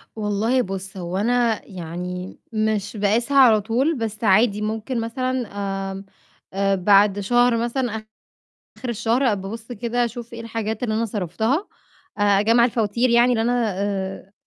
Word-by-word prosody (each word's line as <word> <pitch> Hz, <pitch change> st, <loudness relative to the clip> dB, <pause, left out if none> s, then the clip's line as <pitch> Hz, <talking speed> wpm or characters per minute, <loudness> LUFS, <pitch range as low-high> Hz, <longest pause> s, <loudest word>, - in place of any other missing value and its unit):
والله 220 Hz, +4 st, +1 dB
بُصّ، 195 Hz, -2 st, -6 dB
هو 180 Hz, +1 st, -4 dB
أنا 235 Hz, +1 st, +1 dB
يعني 180 Hz, 0 st, -6 dB
مش 215 Hz, -1 st, -1 dB
باقيسها 230 Hz, +7 st, +1 dB
على 225 Hz, -6 st, +7 dB
طول 255 Hz, +9 st, +1 dB
بس 220 Hz, -1 st, -4 dB
عادي 210 Hz, +1 st, +3 dB
ممكن 220 Hz, +3 st, -2 dB
مثلًا، 255 Hz, +1 st, -2 dB, 0.4 s
آمم، 195 Hz, +1 st, -8 dB, 0.5 s
آآ، 195 Hz, 0 st, +1 dB
بعد 200 Hz, +2 st, +4 dB
شهر 240 Hz, +3 st, +3 dB
مثلًا، 240 Hz, +2 st, -1 dB, 0.9 s
آخر 255 Hz, -, -6 dB
الشهر 235 Hz, +1 st, +1 dB
بأبُص 220 Hz, +5 st, -7 dB
كده، 240 Hz, +2 st, -1 dB
أشوف 235 Hz, 0 st, -6 dB
إيه 230 Hz, -, -7 dB
الحاجات 225 Hz, -1 st, -4 dB
اللي 220 Hz, -3 st, 0 dB
أنا 230 Hz, +1 st, 0 dB
صرفتها، 220 Hz, -, -1 dB, 0.5 s
آآ، -, -, 0 dB, 0.2 s
أجمع 230 Hz, +3 st, +4 dB
الفواتير 235 Hz, +1 st, +1 dB
يعني 240 Hz, +1 st, +5 dB
اللي 225 Hz, -1 st, +1 dB
أنا 235 Hz, -3 st, +1 dB
آآ، 195 Hz, -1 st, -3 dB
220 Hz, 145 wpm, -22 LUFS, 200-240 Hz, 0.9 s, على